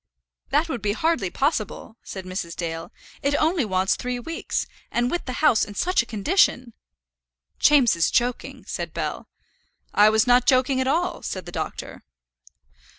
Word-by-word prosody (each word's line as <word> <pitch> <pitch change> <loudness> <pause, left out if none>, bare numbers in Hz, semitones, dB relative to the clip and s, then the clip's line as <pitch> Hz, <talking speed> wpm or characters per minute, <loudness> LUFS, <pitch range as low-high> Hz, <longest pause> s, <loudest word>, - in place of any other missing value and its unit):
"That 300 +4 +2
would 260 -8 -4
be 205 0 0
hardly 290 - 0
possible," 225 - -2
said 190 -1 -8
Mrs. 185 -2 -5
Dale. 165 -1 -5 0.3
"It 280 +1 +1
only 320 -1 +2
wants 190 -2 +1
three 250 0 -3
weeks; 330 +8 -3 0.2
and 240 +1 0
with 350 - -2
the 255 - -4
house 245 -8 +5
in 205 - -6
such 365 - +2
a 235 - -9
condition!" 245 - +1 0.9
"James 275 -9 +5
is 165 -1 +2
joking," 245 0 -1
said - - -5
Bell. - - -4 0.7
"I 210 +1 +6
was 220 0 +3
not 245 0 +4
joking 260 0 +3
at 260 - -1
all," 345 +6 0
said 185 - -5
the 175 - -8
doctor. - - -5
245 Hz, 160 wpm, -24 LUFS, 205-285 Hz, 0.9 s, I